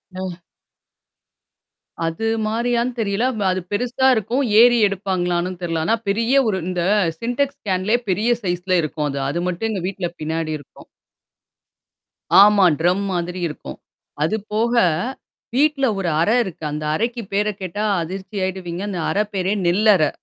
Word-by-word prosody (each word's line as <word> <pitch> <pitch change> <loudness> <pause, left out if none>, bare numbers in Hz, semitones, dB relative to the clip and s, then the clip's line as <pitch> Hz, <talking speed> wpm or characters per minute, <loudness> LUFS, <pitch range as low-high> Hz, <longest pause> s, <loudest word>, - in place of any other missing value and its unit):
அ. 185 -2 -5 1.7
அது 165 +7 -3 0.2
மாரியான்னு 235 +2 0
தெரியல. 205 +1 0 0.3
அது 185 0 -2
பெருசா 245 +5 +1
இருக்கும். 235 +6 0 0.2
ஏறி 240 0 +6
எடுப்பாங்களான்னும் 185 -2 -2
தெர்ல. 165 -2 -2
ஆனா 225 - +3
,பெரிய 230 +5 +1 0.2
ஒரு 190 -2 -1
இந்த 180 -1 -2 0.4
சின்டெக்ஸ் 245 +4 -1
கேன் 185 +1 0
லயே 240 +2 +3
பெரிய 210 +6 +1
சைஸ் 175 -1 -2
ல - - +5
இருக்கும் 150 0 -2
அது. 140 0 -3
அது 170 +4 -2
மட்டும் 200 +6 -2
எங்க 195 -4 -3
வீட்ல 185 -3 -3
பின்னாடி 160 0 -2
இருக்கும். 140 - -17 1.6
ஆமா. 205 -2 +5
ட்ரம் 180 +4 +2
மாதிரி 175 +1 -3
இருக்கும். 150 - -9 0.4
அது 190 +8 +1 0.2
போக. 230 +3 +1 0.8
வீட்ல 290 -1 +3
ஒரு 175 -3 -1
அறை 215 +8 +3
இருக்கு. 170 -5 -9
அந்த 150 +1 -4
அறைக்கு 235 +3 -2
பேர 205 +1 +1
கேட்டா 190 +3 -3 0.2
அதிர்ச்சி 190 +4 -7
ஆயிடுவீங்க. 185 -1 -5
அந்த 180 -3 -4
அறை 210 +1 +1
பேரே 190 +1 0
நெல்லறை! 190 -3 +4
190 Hz, 140 wpm, -21 LUFS, 175-225 Hz, 1.7 s, ஏறி